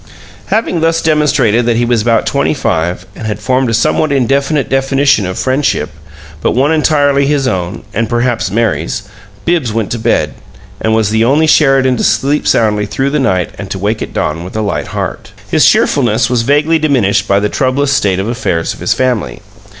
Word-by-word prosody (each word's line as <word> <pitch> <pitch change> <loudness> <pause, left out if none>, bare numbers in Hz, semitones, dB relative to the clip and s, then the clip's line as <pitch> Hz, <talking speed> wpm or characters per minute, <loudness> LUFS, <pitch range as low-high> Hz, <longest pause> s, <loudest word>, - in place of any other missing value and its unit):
Having 215 -6 0
thus 165 0 +2
demonstrated 140 -8 +1
that 115 -1 +1
he 120 - +1
was 120 -2 +1
about 115 0 +1
twenty 140 +2 0
five 90 - -2
and 110 - -6
had 105 -2 -2
formed 130 +3 0
a - - -1
somewhat 140 +6 +1
indefinite 140 0 +1
definition 135 -5 +1
of 95 - -5
friendship, 130 - 0 0.5
but - - 0
one 135 +5 +2
entirely 145 -3 +2
his 140 -2 0
own 95 -1 -3
(and 115 -1 -1
perhaps 120 -3 0
Mary's) 105 -4 -1 0.4
Bibbs 165 -9 0
went 110 -2 -2
to 120 - -2
bed, 80 - 0 0.5
and 110 0 +1
was 110 -2 +1
the 110 +1 +2
only 145 +6 +3
Sheridan 135 -4 +3
to - - -2
sleep 145 +3 +1
soundly 105 -2 +1
through 135 +7 -1
the 150 - 0
night 95 -10 0
and 100 -1 -6
to 95 - -4
wake 105 +3 -2
at - - -5
dawn 80 +2 -2
with 90 - -9
a 110 - -1
light 105 - -2
heart. - - -5 0.2
His - - +4
cheerfulness 120 -3 +1
was 125 -2 +2
vaguely 150 +6 +2
diminished 105 -10 +1
by 100 0 +3
the 105 - 0
troublous 135 +4 0
state 100 -8 +1
of 95 +2 -2
affairs 115 -9 -2
of - - -14
his - - 0
family. 125 -6 -1
120 Hz, 195 wpm, -13 LUFS, 105-140 Hz, 0.5 s, His